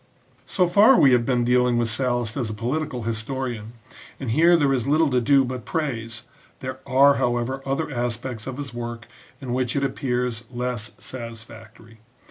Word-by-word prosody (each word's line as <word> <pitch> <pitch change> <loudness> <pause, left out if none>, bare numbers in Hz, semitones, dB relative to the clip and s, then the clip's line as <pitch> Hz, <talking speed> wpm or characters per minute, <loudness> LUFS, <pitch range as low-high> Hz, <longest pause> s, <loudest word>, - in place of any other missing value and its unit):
So 185 - +2
far 205 +9 +6
we 135 - +6
have 120 -2 +3
been 125 -2 +1
dealing 125 0 +3
with 120 -1 +1
Sallust 120 0 -1
as 125 -5 -2
a 110 - -5
polit 135 +8 -2
ical 125 -6 -6
historian, 115 0 -4 0.5
and 130 -5 -3
here 170 +7 +5
there 140 -4 +2
is 125 -2 -1
little 155 0 +3
to 125 -1 +2
do 135 +2 +4
but 125 -1 -5
praise; 120 -8 -4 0.4
there 130 0 -6
are, 140 +1 +5
however, 120 +2 -1
other 140 +3 -1
aspects 120 -1 -4
of 130 0 -5
his 140 -4 -6
work 120 -1 -6 0.3
in 130 -3 -5
which 125 -1 -1
it 140 - 0
appears 125 -4 -2
less 120 -4 -4
satisfactory. 115 -2 -9
125 Hz, 175 wpm, -23 LUFS, 115-135 Hz, 0.5 s, far